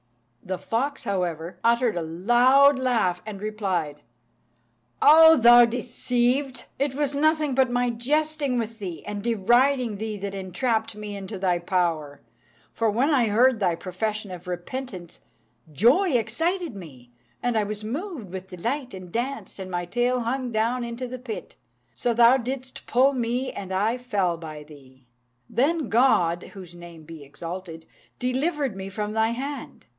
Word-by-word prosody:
The 185 -1 -3
fox, 240 +10 -2
however, 175 -2 -3
uttered 235 -1 +2
a 175 - -1
loud 240 - +4
laugh, 225 -9 +1
and 210 -3 -7
replied, 190 -8 -3 1.0
"O 320 +1 +8
thou 240 0 +8
deceived! 245 +2 -1
it 275 -1 0
was 290 -1 -1
nothing 305 -1 +2
but 260 0 +3
my 245 0 +1
jesting 290 +2 0
with 230 -1 -4
thee 180 -5 -6
and 205 -1 -5
deriding 240 +2 +2
thee 215 0 -4
that 200 0 -5
entrapped 210 +4 -2
me 210 -1 -7
into 200 +1 -7
thy 180 -2 +1
power; 170 -5 -1 0.5
for 225 -1 +1
when 250 +9 +1
I 250 -5 +3
heard 235 +3 +3
thy 180 -5 +1
profession 210 +3 -4
of 180 0 -9
repentance, 180 0 -6 0.5
joy 270 - +3
excited 320 - -1
me, 130 -10 -12 0.3
and 245 -1 0
I 215 - +2
was 210 +1 -5
moved 270 - -5
with 190 0 -7
delight, 235 +7 -4
and 185 -2 -10
danced, 250 +1 -4
and 190 -1 -6
my 175 -1 -3
tail 245 +6 0
hung 250 +1 -2
down 230 +3 0
into 235 +2 -5
the 255 +1 -7
pit; 235 -3 -7 0.4
so 240 - -1
thou 235 +2 +6
didst 260 +1 -6
pull 265 +3 +4
me, 250 +1 -1
and 190 -1 -7
I 215 +6 0
fell 200 -8 0
by 155 -2 -9
thee. 130 -4 -17 0.4
Then 300 +2 +1
God 180 -9 +3
(whose 180 -3 -10
name 170 -2 -12
be 160 -1 -11
exalted!) 165 +3 -8 0.3
delivered 270 - -1
me 195 0 -6
from 210 +1 -4
thy 220 0 +2
hand. 270 +3 -6
225 Hz, 155 wpm, -25 LUFS, 185-255 Hz, 1.0 s, O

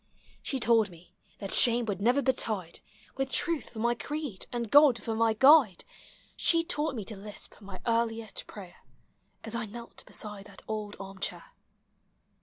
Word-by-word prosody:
She 270 - -2
told 225 -3 +3
me 170 0 -17 0.2
that 195 - -5
shame 240 0 +6
would 200 -3 -3
never 250 +6 +3
betide 215 -9 -1 0.4
With 270 0 -1
Truth 335 +3 0
for 230 - -14
my 235 +2 +1
creed, 290 -4 -5
and 235 -3 -4
God 280 -6 +6
for 225 - -2
my 225 0 +2
guide, 265 - +6 0.5
She 330 -1 +3
taught 305 -4 -2
me 215 -4 -5
to 220 - -7
lisp 205 +1 -10
my 195 -2 -9
earliest 230 -2 -1
prayer, 190 -4 -11 0.7
As 225 - -7
I 230 -1 -3
knelt 235 +3 -11
beside 210 -2 -6
that 200 -1 -13
old 210 -1 -4
arm 195 0 -9
chair. - - -5
225 Hz, 165 wpm, -29 LUFS, 205-250 Hz, 0.7 s, shame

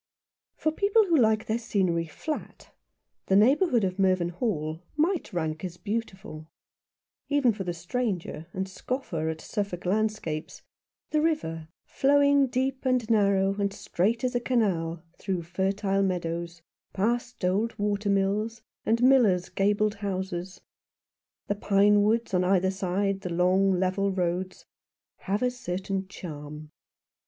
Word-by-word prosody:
FOR 310 - 0
people 405 +6 +3
who 340 -4 +2
like 220 -5 +3
their 220 +2 -1
scenery 185 -7 0
flat 300 - -6 0.6
the 190 - +3
neigh 225 +8 +6
bourhood 300 - +2
of 185 0 -2
Mervynhall 175 -3 0 0.2
might 330 -2 +1
rank 160 -3 -3
as 175 -2 -5
beautiful. 190 -8 -5 0.8
Even 285 -5 +3
for 200 -2 -5
the 180 - -2
stranger, 175 -2 -3
and 190 +1 -2
the 190 - -13
scoffer 185 - -3
at 160 0 -4
Suffolk 200 -3 -4
landscapes, 205 -6 -2 0.5
the 305 - +2
river, 165 - -1 0.2
flowing 280 0 +4
deep 260 +1 -1
and 255 -4 +1
narrow 200 -2 +3
and 200 -1 +1
straight 215 +8 -1
as 255 0 0
a 245 - +1
canal 180 -10 0 0.2
through 185 -3 -2
fertile 195 +3 0
meadows, 170 -2 -2 0.3
past 235 +2 -1
old 205 +6 0
water 205 0 -1
mills, 205 +3 0 0.2
and 230 +2 +2
millers' 225 -9 +4
gabled 205 +1 +1
houses, 190 -2 -4 0.8
the - - 0
pine 205 0 +4
woods 225 +1 +1
on 180 0 +3
either 190 0 +2
side 195 +1 -1
the 185 - -4
long 185 +3 +3
level 190 +2 +1
roads, 180 0 -2 0.5
have 200 +5 -2
a 250 - +2
certain 190 -4 -4
charm. 150 -4 -8
195 Hz, 135 wpm, -27 LUFS, 180-230 Hz, 0.8 s, neigh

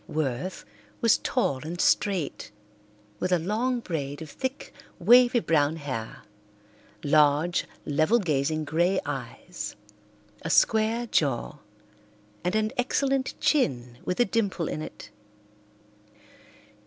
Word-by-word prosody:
Worth 150 +3 -3 0.3
was 230 -2 +4
tall 140 - 0
and 170 +3 -6
straight, 185 -8 +1 0.7
with 185 - -1
a 180 - +5
long 230 +8 -1
braid 145 -7 -4
of 155 - -11
thick, 260 +1 -5 0.2
wavy 240 +6 +6
brown 155 -6 +2
hair, 130 -8 -6 0.8
large, 150 +3 +3 0.2
level 155 +10 +3
gazing 155 - 0
grey 170 +5 +2
eyes, - - -6 0.7
a - - -4
square 225 +2 +3
jaw, 145 - 0 0.8
and 180 +3 0
an 215 0 +1
excellent 270 +1 0
chin 125 - +1
with 180 - -3
a 245 - +5
dimple 195 -6 -1
in 155 - -4
it. 110 -8 -9
175 Hz, 110 wpm, -27 LUFS, 145-225 Hz, 0.8 s, wavy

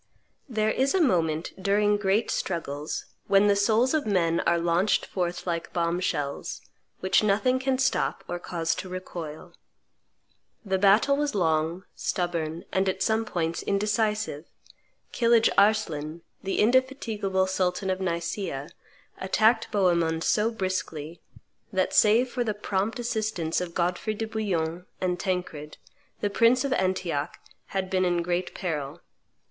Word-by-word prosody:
There 215 -2 +1
is 270 +8 +1
a - - +3
moment, 165 - +1
during 205 +2 +3
great 205 +2 +1
struggles, 150 -4 -3 0.2
when 195 +1 +5
the 205 -1 +4
souls 220 +6 +3
of 310 -6 0
men 170 -5 +2
are 170 - +4
launched 170 +4 +2
forth 175 -2 -3
like 170 -2 -3
bomb 170 0 0
shells, 145 -6 -2 0.4
which 190 +1 +3
nothing 215 +5 +2
can 260 0 0
stop 260 0 0
or 175 - -4
cause 165 -2 -1
to 185 - -10
recoil. 170 -4 -7 1.1
The 190 -1 0
battle 205 +8 +5
was 290 -4 -1
long, 165 0 +1
stubborn, 170 -2 -2
and, 190 0 +1
at 190 0 -1
some 220 +2 +1
points, 170 -5 -2
indecisive: 210 -4 0 0.7
Kilidge 230 -2 +4
Arslan, 165 -6 +1 0.2
the 195 - -2
indefatigable 225 -6 +1
sultan 190 0 0
of 185 0 -2
Nicaea, 170 -4 -3 0.5
attacked 220 +4 +2
Bohemond 170 -5 +2
so 215 +1 +2
briskly, 175 -6 -4 0.5
that, 185 -1 0
save 225 +4 +5
for 245 0 -2
the 215 -3 -2
prompt 205 +2 -2
assistance 215 -9 -1
of 175 -2 -5
Godfrey 180 +5 -1
de 225 - -3
Bouillon 180 -6 -2
and 180 -1 -1
Tancred, 180 -6 -3 0.4
the 205 - 0
prince 235 +5 +4
of 275 - 0
Antioch 185 - -1 0.3
had 190 -1 -2
been 185 -1 +2
in 175 -1 +1
great 175 +1 -2
peril. 155 -3 -4
190 Hz, 140 wpm, -26 LUFS, 170-215 Hz, 1.1 s, when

